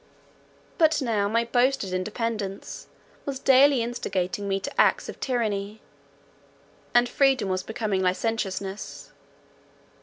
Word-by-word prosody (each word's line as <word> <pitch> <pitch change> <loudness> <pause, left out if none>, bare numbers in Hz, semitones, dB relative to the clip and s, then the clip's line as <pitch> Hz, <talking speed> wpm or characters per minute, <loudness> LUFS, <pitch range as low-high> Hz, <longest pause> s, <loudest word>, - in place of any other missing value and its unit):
But 320 -1 +4
now 220 -6 0
my 230 +2 +1
boasted 245 -4 +1
independence 210 +1 -4 0.4
was 275 -2 -4
daily 270 -1 +5
instigating 200 -5 -3
me 195 0 0
to - - +1
acts - - +2
of - - -8
tyranny, 215 -4 -2 1.1
and 240 0 +4
freedom 270 -6 +2
was 185 0 0
becoming 215 -2 -2
licentiousness. 195 0 -2
220 Hz, 110 wpm, -26 LUFS, 195-245 Hz, 1.1 s, daily